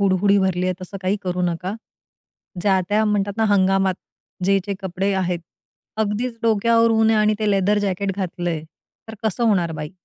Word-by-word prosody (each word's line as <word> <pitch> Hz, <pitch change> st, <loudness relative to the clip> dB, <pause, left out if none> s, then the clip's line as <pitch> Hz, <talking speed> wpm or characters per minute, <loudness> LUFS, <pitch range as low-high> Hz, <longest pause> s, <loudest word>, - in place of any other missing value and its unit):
हुडहुडी 200 Hz, +1 st, +3 dB
भरली 185 Hz, -2 st, 0 dB
आहे. 185 Hz, -, 0 dB
तसं 185 Hz, +2 st, -7 dB
काही 190 Hz, +3 st, +1 dB
करू 180 Hz, -1 st, -2 dB
नका. 180 Hz, +3 st, -2 dB, 0.9 s
ज्या 190 Hz, -2 st, +3 dB
त्या 215 Hz, +1 st, +2 dB
म्हणतात 205 Hz, -1 st, 0 dB
ना, 220 Hz, -, +2 dB
हंगामात 195 Hz, -2 st, +3 dB, 0.5 s
जे-जे 195 Hz, 0 st, +1 dB
कपडे 190 Hz, +2 st, -1 dB
आहेत. 180 Hz, -2 st, 0 dB, 0.6 s
अगदीच 220 Hz, +3 st, -2 dB
डोक्यावर 230 Hz, +1 st, +3 dB
ऊन 220 Hz, 0 st, +3 dB
आणि 215 Hz, -1 st, +3 dB
ते 215 Hz, -1 st, +1 dB
लेदर 200 Hz, +1 st, +2 dB
जॅकेट 200 Hz, -1 st, -1 dB
घातलंय, 175 Hz, -4 st, -3 dB, 0.5 s
तर 220 Hz, -, -7 dB
कसं 220 Hz, +3 st, 0 dB
होणार 180 Hz, -7 st, +2 dB
बाई? 150 Hz, 0 st, -6 dB
195 Hz, 160 wpm, -21 LUFS, 185-210 Hz, 0.9 s, हुडहुडी